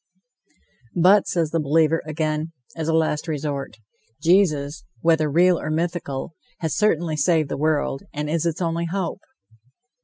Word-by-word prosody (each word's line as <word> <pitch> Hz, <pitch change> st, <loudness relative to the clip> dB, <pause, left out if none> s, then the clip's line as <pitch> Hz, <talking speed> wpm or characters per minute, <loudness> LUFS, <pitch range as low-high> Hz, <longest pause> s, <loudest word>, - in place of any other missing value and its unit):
"But," 185 Hz, +4 st, +5 dB
says 165 Hz, -3 st, 0 dB
the 165 Hz, -, +1 dB
believer, 160 Hz, +2 st, +2 dB
again, 155 Hz, +1 st, -2 dB, 0.2 s
as 160 Hz, -2 st, -3 dB
a 165 Hz, -, +1 dB
last 160 Hz, 0 st, 0 dB
resort, 145 Hz, -6 st, -3 dB, 0.4 s
"Jesus, 160 Hz, -4 st, +2 dB, 0.2 s
whether 160 Hz, -2 st, +3 dB
real 175 Hz, +4 st, +4 dB
or -, -, -4 dB
mythical, 160 Hz, -3 st, -2 dB, 0.2 s
has 160 Hz, -3 st, -2 dB
certainly 170 Hz, -6 st, +1 dB
saved 155 Hz, 0 st, +2 dB
the -, -, -2 dB
world, 150 Hz, -2 st, 0 dB
and 150 Hz, 0 st, -4 dB
is 165 Hz, +2 st, 0 dB
its 170 Hz, +2 st, -2 dB
only 170 Hz, 0 st, -1 dB
hope." 185 Hz, +2 st, -3 dB
160 Hz, 145 wpm, -23 LUFS, 150-170 Hz, 0.4 s, But